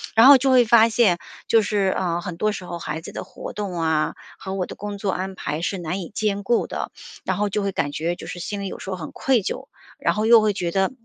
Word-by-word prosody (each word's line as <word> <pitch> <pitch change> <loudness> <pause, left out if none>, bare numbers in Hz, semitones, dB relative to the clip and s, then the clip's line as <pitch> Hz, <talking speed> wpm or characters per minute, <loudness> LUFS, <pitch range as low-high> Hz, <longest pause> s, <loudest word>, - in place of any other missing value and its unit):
然 230 +4 +8
后 280 - +10
就 265 +1 +1
会 250 -2 +6
发 225 0 +6
现， 215 -6 +3 0.3
就 225 - +5
是， 210 0 -1 0.2
啊， 175 -2 -1
很 175 -1 -6
多 215 +4 +1
时 200 -3 -6
候 175 -1 -5
孩 155 0 -4
子 - - -9
的 - - -5
活 185 - -9
动 205 -2 -4
啊， 160 -2 +1 0.2
和 190 - -6
我 185 -2 -1
的 - - -9
工 205 0 -6
作 200 -1 -1
安 190 +1 -3
排 150 -2 -3
是 190 +2 -1
难 180 +3 -3
以 170 - -7
兼 205 -2 -1
顾 235 +4 +1
的。 - - -4 0.3
然 - - 0
后 210 0 +1
就 205 +1 -1
会 200 - 0
感 145 -5 -1
觉 165 +4 -1
就 - - -9
是 175 - -6
心 200 +3 -4
里 195 - -3
有 - - -7
时 - - -7
候 185 - -2
很 160 -3 -7
愧 260 -4 +2
疚， - - -4 0.3
然 - - +1
后 215 +1 0
又 230 0 +7
会 215 -1 +2
觉 175 -3 -2
得， 190 +1 +1
195 Hz, 295 characters per minute, -23 LUFS, 175-215 Hz, 0.3 s, 后